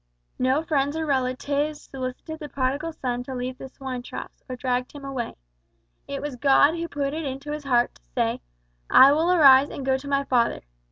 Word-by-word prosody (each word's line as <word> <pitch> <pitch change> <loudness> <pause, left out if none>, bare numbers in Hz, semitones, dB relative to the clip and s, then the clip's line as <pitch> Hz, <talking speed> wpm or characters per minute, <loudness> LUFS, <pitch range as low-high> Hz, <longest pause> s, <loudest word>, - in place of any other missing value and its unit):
No 260 +5 +2
relatives 285 -2 0
or 265 -5 0
friends 290 +3 -2
solicited 265 +4 -6
the 295 - -7
Prodigal 280 +5 -1
Son 245 -5 -3
to 260 +1 -6
leave 250 +1 -4
the 265 - -8
swine 260 -2 -6
troughs, 245 - -9
or 255 - -3
dragged 250 0 -2
him 285 -2 -9
away. 265 -4 -4 0.7
It 280 0 -5
was 290 -4 -4
God 280 +3 +5
who 335 0 -3
put 280 -3 -2
it 320 +1 -3
into 275 +1 -5
his 300 -1 -5
heart 245 -3 +2
to - - -23
say - - 0 0.5
`I 275 +2 +8
will 330 +3 +2
arise 280 -5 +7
and 270 - -6
go 265 0 +2
to 280 - -10
my 280 0 +1
father.' 245 -4 +1
275 Hz, 200 wpm, -25 LUFS, 255-295 Hz, 0.7 s, `I